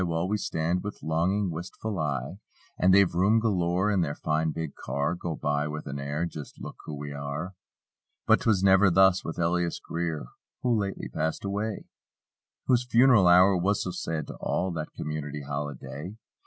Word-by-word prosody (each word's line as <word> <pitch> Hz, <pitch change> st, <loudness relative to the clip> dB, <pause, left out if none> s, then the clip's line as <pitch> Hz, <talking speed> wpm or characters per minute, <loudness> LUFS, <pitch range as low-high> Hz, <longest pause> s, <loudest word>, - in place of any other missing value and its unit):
While 85 Hz, 0 st, -1 dB
we 105 Hz, +2 st, 0 dB
stand 85 Hz, 0 st, -1 dB
with 105 Hz, 0 st, -7 dB
longing, 90 Hz, +5 st, +1 dB
wistful 90 Hz, +4 st, -5 dB
eye; 75 Hz, +4 st, -2 dB, 0.4 s
And 90 Hz, -, +3 dB
they've 100 Hz, -2 st, +5 dB
room 95 Hz, +6 st, +4 dB
galore 95 Hz, -2 st, +1 dB
in 100 Hz, -3 st, +2 dB
their 75 Hz, -3 st, -1 dB
fine 80 Hz, +1 st, 0 dB
big 80 Hz, -2 st, -4 dB
car. 70 Hz, +4 st, -2 dB
Go 85 Hz, -2 st, -4 dB
by 75 Hz, 0 st, -1 dB
with 75 Hz, 0 st, -5 dB
an 70 Hz, 0 st, -5 dB
air: 70 Hz, +4 st, -2 dB
"Just 75 Hz, -4 st, -8 dB
look -, -, -8 dB
who 75 Hz, -, -5 dB
we 70 Hz, 0 st, -6 dB
are." 70 Hz, +6 st, -5 dB, 0.7 s
But -, -, +4 dB
'twas 100 Hz, -5 st, +2 dB
never 95 Hz, +1 st, +6 dB
thus 95 Hz, +1 st, +5 dB
with 80 Hz, -, -5 dB
Elias 85 Hz, 0 st, 0 dB
Greer, 85 Hz, -4 st, -3 dB, 0.4 s
(Who 125 Hz, -2 st, +3 dB
lately 100 Hz, -2 st, -2 dB
passed 80 Hz, +4 st, -2 dB
away) 105 Hz, +2 st, -3 dB, 0.8 s
Whose 125 Hz, -1 st, +3 dB
funeral 120 Hz, -5 st, +6 dB
hour 90 Hz, +2 st, +7 dB
was 95 Hz, +3 st, +1 dB
so 90 Hz, -, -3 dB
sad 80 Hz, -4 st, -3 dB
to -, -, -7 dB
all— 95 Hz, -, -1 dB
That 80 Hz, -2 st, -5 dB
community 75 Hz, -1 st, -5 dB
holiday! 75 Hz, -, -6 dB
85 Hz, 175 wpm, -27 LUFS, 75-95 Hz, 0.8 s, hour